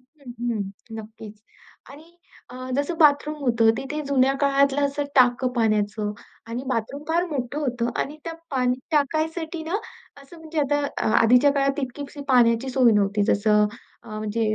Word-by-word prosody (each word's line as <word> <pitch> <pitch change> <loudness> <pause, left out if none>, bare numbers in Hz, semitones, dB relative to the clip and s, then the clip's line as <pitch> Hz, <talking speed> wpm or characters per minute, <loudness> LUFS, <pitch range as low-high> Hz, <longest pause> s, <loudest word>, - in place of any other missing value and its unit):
हं, 260 -1 -14 0.2
हं. 210 - -1 0.3
नक्कीच 215 -1 -11 0.5
आणि 320 +5 -15 0.3
अ, 250 - -9 0.2
जसं 290 +4 -1
बाथरूम 300 0 +4
होतं, 235 -3 +3
तिथे 285 +5 -4
जुन्या 270 -1 +3
काळातलं 280 0 +3
असं 280 +1 -3
टाकं 250 -1 +4
पाण्याचं 215 -3 0 0.4
आणि 235 +2 -4
बाथरूम 255 +3 -3
फार 340 +2 +2
मोठं 275 -1 -3
होतं 245 -5 -1
आणि 295 +2 -4
त्या 330 - -4 0.2
पाणी 250 -2 +1 0.2
टाकायसाठी 320 +2 -1
ना, 335 +5 -1 0.5
असं 275 +5 -15
म्हणजे 320 0 -6
आता 290 +1 +1 0.2
अ, - - -1 0.2
आधीच्या 250 +5 +5
काळात 275 0 0
इतकीशी 280 +3 -6
पाण्याची 240 -1 +4
सोय 250 -2 +4
नव्हती. 205 0 +2
जसं 210 0 +3 0.4
अ, 235 - -15
म्हणजे 215 0 -1
265 Hz, 155 wpm, -24 LUFS, 230-290 Hz, 0.5 s, आधीच्या